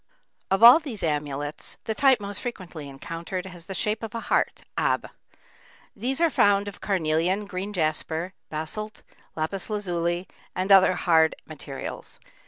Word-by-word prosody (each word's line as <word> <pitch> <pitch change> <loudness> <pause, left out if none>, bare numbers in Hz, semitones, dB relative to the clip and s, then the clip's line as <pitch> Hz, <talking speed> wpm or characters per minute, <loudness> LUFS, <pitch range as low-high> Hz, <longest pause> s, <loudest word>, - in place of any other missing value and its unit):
Of 195 +3 +2
all 240 +6 +11
these 270 -10 -6
amulets, 145 -1 -3
the 220 - -2
type 265 +1 +4
most 200 -1 -5
frequently 180 - -6
encountered 165 +6 -5
has 175 -3 -9
the 195 - -6
shape 210 +3 0
of 225 -1 -6
a - - -1
heart, - - 0
ab. - - +1 0.9
These 255 +7 -1
are 335 -1 +3
found 205 -3 +3
of 200 - -8
carnelian, 180 +1 +1
green 195 +1 -4
jasper, 160 0 -1 0.2
basalt, 185 +8 -4 0.3
lapis 165 +6 -3
lazuli, 175 -4 -1 0.3
and 185 +2 -1
other 190 -1 +7
hard 160 -2 +3
materials. 140 -3 -7
185 Hz, 145 wpm, -26 LUFS, 160-210 Hz, 0.9 s, all